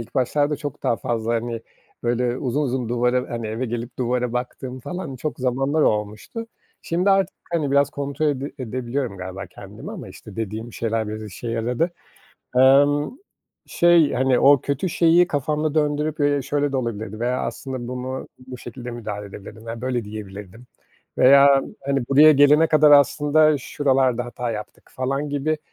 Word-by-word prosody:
ilk 115 - -10
başlarda 145 +3 +1
çok 145 -2 -7
daha 115 - +1
fazla, 115 0 -2
hani, 115 0 -3 0.4
böyle, 120 +1 0
uzun 135 +3 -1
uzun 125 -3 -2
duvara, 125 +1 0
hani, 115 -1 -4
eve 110 +4 -3
gelip 120 +1 -5
duvara 125 -1 -1
baktığım 125 +1 -5
falan 180 -3 -6
çok 150 +5 -4
zamanlar 135 +4 0
olmuştu. 105 - -2 0.4
Şimdi 180 +4 +1
artık, 195 0 +2 0.2
hani, 155 -5 0
biraz 140 +1 +3
kontrol 140 +2 -2
ede 140 -1 -2
edebiliyorum 125 -1 -3
galiba 95 +1 -7
kendimi - - -11
ama, - - -8
işte, 105 -1 -13
dediğim 110 +2 -5
şeyler 115 -1 -2
biraz 110 +1 -5
işe 105 +4 -7
yaradı. 120 +8 -1 0.7
Emm, 145 +3 +5 0.6
şey, 170 -3 +4
hani, 130 0 +2
o 140 -1 +6
kötü 140 +8 -2
şeyi 170 +1 +4
kafamda 150 +1 -1
döndürüp, 150 +1 0
eee, 145 -1 +2
"Şöyle 145 +1 -1
de - - 0
olabilirdi 110 -3 -4
veya 125 +2 0
aslında 130 -3 -5
bunu 130 +1 -5 0.2
bu 130 -1 -8
şekilde 120 +1 -8
müdahale 105 -4 -6
edebilirdim 100 +3 -11
veya 115 0 -6
böyle 125 -3 -2
diyebilirdim 105 +1 -9 0.5
veya, 140 +1 +7 0.2
hani, 135 -2 0
buraya 150 +3 +7
gelene 145 +3 +5
kadar 155 -1 +5
aslında 150 +2 +5
şuralarda 130 -2 +1
hata 120 0 -4
yaptık." 105 -1 -8
falan 135 +3 -2
gibi, 145 +2 -1
130 Hz, 160 wpm, -22 LUFS, 120-145 Hz, 0.7 s, veya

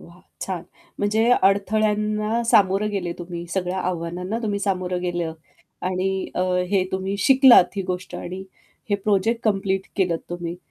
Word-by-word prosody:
वाह! 170 +1 -16 0.2
छान. 180 -3 -4 0.4
म्हणजे 210 +2 +1 0.2
अडथळ्यांना 210 +2 +1
सामोरं 210 -3 +3
गेले 180 -4 -2
तुम्ही 175 -1 -6
सगळ्या 180 +1 -2
आव्हानांना 180 +5 -3
तुम्ही 205 -2 -1
सामोरं 185 -2 -1
गेले 175 -1 -2 0.6
आणि 185 +1 -1
अ, - - -1 0.3
हे 190 -2 +2
तुम्ही 190 +1 -2
शिकलात 260 -1 +7
ही 195 - -1
गोष्ट 180 0 -4
आणि 185 +2 -6 0.5
हे - - +4
प्रोजेक्ट 205 +3 +1
कंप्लीट 195 -2 0
केलंत 175 -4 +1
तुम्ही. 175 0 -4
190 Hz, 140 wpm, -23 LUFS, 180-210 Hz, 0.6 s, शिकलात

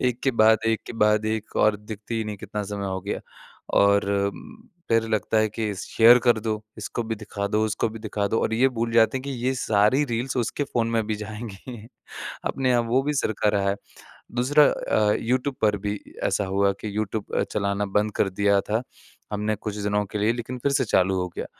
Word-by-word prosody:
एक 120 0 -4
के 135 - +3
बाद 110 0 +6
एक 115 -1 +1
के - - -6
बाद 105 0 +3
एक 110 0 -3
और 105 -1 +4
दिखती 105 +2 -7
ही 110 - -2
नहीं 105 -1 -5
कितना 105 +2 -5
समय 100 0 -4
हो 95 0 -3
गया। 100 +2 -4 0.6
और 100 0 +5 0.9
फ़िर 115 0 +2
लगता 110 0 +1
है 110 0 +3
कि 105 -1 -3
स 95 - -6
शेयर 120 +2 +7
कर 120 -2 +5
दो। 110 -1 -2 0.2
इसको 110 +2 -3
भी 115 0 -3
दिखा 100 -1 -4
दो 110 +1 +1
उसको 105 +1 0
भी 110 +1 -8
दिखा 105 -2 -2
दो 115 - +1
और 110 - 0
ये 130 +4 +4
भूल 115 0 0
जाते 115 +3 +4
हैं - - -9
कि 140 - -5 0.2
ये 130 - +2
सारी 110 +4 +2
रील्स 125 +3 -2
उसके 125 +4 -1
फ़ोन 115 -3 -1
में 115 -1 +1
भी 110 - -1
जाएँगी। 110 +2 -7 0.7
अपने 130 -1 0
यहाँ 120 -1 +3
वो 130 +3 +3
भी 150 +1 -1
सरका 110 -5 0
रहा 100 -1 +1
है। 100 - -1 0.6
दूसरा 145 +5 +5
अ, 105 -1 +1
यूट्यूब 130 +3 -1
पर 105 -1 +3
भी 105 +1 -3 0.3
अ, - - +2
ऐसा 100 - 0
हुआ 100 +1 +2
कि 105 -1 -5
यूट्यूब 110 0 -3
अ, - - +2
चलाना 100 0 0
बंद 105 +2 0
कर 95 - +2
दिया 100 +1 +2
था 110 +3 +1 0.5
हमने 105 +1 0
कुछ 105 0 -5
दिनों 105 0 0
के 105 - -2
लिए। 110 +3 +2
लेकिन 120 +1 -5
फ़िर 140 +3 0
से 135 -3 +2
चालू 95 -2 +2
हो 90 - -2
गया - - -4
110 Hz, 220 wpm, -24 LUFS, 105-115 Hz, 0.9 s, शेयर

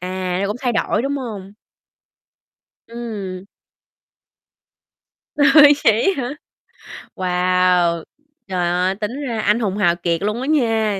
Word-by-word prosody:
À, 185 0 -3
cũng 205 +4 -3
thay 245 -3 -1
đổi, 225 - 0
đúng 280 +2 -2
hông? 210 -7 -7 1.4
Ừm. 210 -6 -6 1.9
Ơi, 290 0 +7
vậy 225 - +3
á 265 - -2
hả? 245 +4 -4 0.8
Wow! 180 -2 +1 0.4
Trời 180 -2 -1
ơi! 180 +2 0
Tính 220 +7 -5
ra 240 -6 -3
anh 210 +2 +2
hùng 205 -4 -2
hào 175 -5 +2
kiệt 170 -1 -2
luôn 210 +4 -2
á 265 - -4
nha, 225 -8 +1
205 Hz, 125 wpm, -19 LUFS, 185-240 Hz, 1.9 s, Ơi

